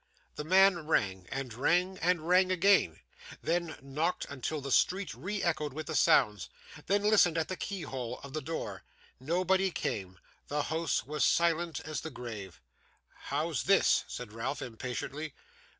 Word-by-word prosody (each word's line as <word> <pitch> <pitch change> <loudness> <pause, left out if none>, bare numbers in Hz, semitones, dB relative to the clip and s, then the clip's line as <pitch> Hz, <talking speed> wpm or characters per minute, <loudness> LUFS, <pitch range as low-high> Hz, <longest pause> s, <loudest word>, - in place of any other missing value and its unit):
The - - -5
man 185 -1 +4
rang, 95 - 0
and 135 -3 -4
rang, 180 +9 +1
and 170 -2 +1
rang 185 +1 +4
again; 185 - +3 0.4
then, 170 -1 -1
knocked 155 +6 -1
until 140 +3 -3
the 140 -1 -6
street 185 +6 +2
re 190 - -4
echoed 155 -5 0
with 155 +2 -5
the 160 - -4
sounds; 105 - +3 0.4
then, 200 +2 +2
listened 205 -6 +4
at 160 - -1
the 185 - -2
keyhole 135 - -5
of 140 -1 -9
the 155 - -2
door. 160 +4 -5 0.4
Nobody 185 +7 +1
came. 95 - -4 0.3
The 145 0 -1
house 160 +2 -1
was 150 +2 -1
silent 170 -1 +2
as 155 0 -4
the 160 - -5
grave. 105 - -8 0.7
'How's - - -1
this?' - - +4
said 115 -4 -7
Ralph 120 +5 -3
impatiently. 130 +5 -5
155 Hz, 150 wpm, -31 LUFS, 130-180 Hz, 0.7 s, man